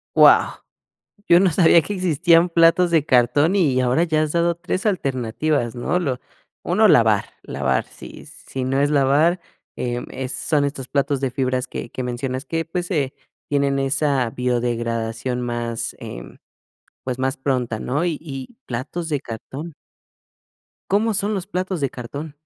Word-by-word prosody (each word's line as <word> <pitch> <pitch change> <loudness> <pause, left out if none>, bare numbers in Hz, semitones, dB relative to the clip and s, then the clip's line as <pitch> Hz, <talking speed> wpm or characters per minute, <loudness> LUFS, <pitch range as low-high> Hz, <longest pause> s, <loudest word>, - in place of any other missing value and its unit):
Guau. - - +6 0.7
Yo 170 +1 +7
no 190 -1 +4
sabía 165 0 +5
que 205 - -5
existían 175 -1 +3
platos 170 +1 +4
de 155 -3 +3
cartón, 145 - +3
y 140 -9 +2
ahora 130 +7 +2
ya 155 -2 +1
has 155 -1 -1
dado 170 0 +2
3 180 +4 -3
alternativas, 135 - -1
¿no? 125 +8 -1
Lo 135 -8 -2 0.4
1, - - +3
lavar, - - +4 0.2
lavar, 65 -1 -1
si - - -12
si 130 -1 -7
no 135 +2 0
es 145 - +2
lavar, 150 +5 +3 0.4
eh, 120 -1 -2
em, 130 0 -5
son 145 +3 0
estos 140 -2 -4
platos 140 -1 0
de 135 -2 -1
fibras 130 0 -1
que - - -7
que 130 - -5
mencionas 130 +2 -3
que, 165 0 -2
pues, 175 +3 -4
eh, 140 -5 -1 0.3
tienen 140 -1 +1
esa 135 -3 +1
biodegradación 120 0 -2
más, 120 -1 -3
em, - - -9 0.7
pues, 130 -1 -4
más 130 0 0
pronta, 125 -5 -1
¿no? 145 +7 -1
Y 165 -4 -1
y 140 - -8
platos 145 +8 -4
de 145 -2 0
cartón. 135 +7 -8 1.2
¿Cómo 215 +3 +2
son 205 +1 0
los 185 - -3
platos 185 -3 -3
de 135 - 0
cartón? 140 +5 -7
140 Hz, 160 wpm, -21 LUFS, 125-165 Hz, 1.2 s, Yo